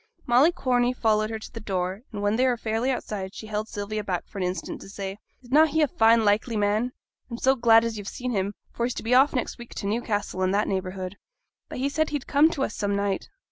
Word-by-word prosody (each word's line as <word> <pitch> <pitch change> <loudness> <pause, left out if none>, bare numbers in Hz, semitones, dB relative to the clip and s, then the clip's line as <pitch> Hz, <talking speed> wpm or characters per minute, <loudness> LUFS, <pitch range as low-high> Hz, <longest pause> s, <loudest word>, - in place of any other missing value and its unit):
Molly 255 +7 +5
Corney 250 -6 +1
followed 215 -3 +1
her 225 - -3
to 220 - -10
the 230 - -7
door, 190 -1 -2
and 205 -2 -5
when 205 +1 +2
they 255 +3 +3
were 245 -1 +1
fairly 225 +2 -1
outside, 205 -6 -3
she - - -8
held 215 0 -3
Sylvia 210 0 -4
back 180 -4 -2
for 200 - -8
an - - 0
instant 180 +1 -3
to - - -11
say, 195 0 -6 0.2
'Is 245 - -15
na' 305 +3 +7
he 315 +1 -1
a - - +3
fine 225 -2 +4
likely 215 +3 +2
man? 210 +4 +1 0.4
I'm 235 - -5
so 265 +2 +3
glad 230 -3 +5
as 225 -2 -3
yo've 200 - -8
seen 250 +3 -4
him, 200 -1 -1 0.2
for 235 - 0
he's 250 - -4
to - - -5
be 230 +2 +1
off 270 +3 +5
next 250 - -2
week 240 - -10
to - - -5
Newcastle 205 -3 -1
and 185 +1 +2
that 210 - +1
neighbourhood.' 185 0 -3 0.5
'But - - -6
he 265 +2 0
said 310 +2 0
he'd 290 -3 -3
come 295 +3 +4
to 285 -5 -2
us 215 - -2
some 200 0 -1
night?' 200 -1 -1
220 Hz, 255 wpm, -26 LUFS, 200-250 Hz, 0.5 s, na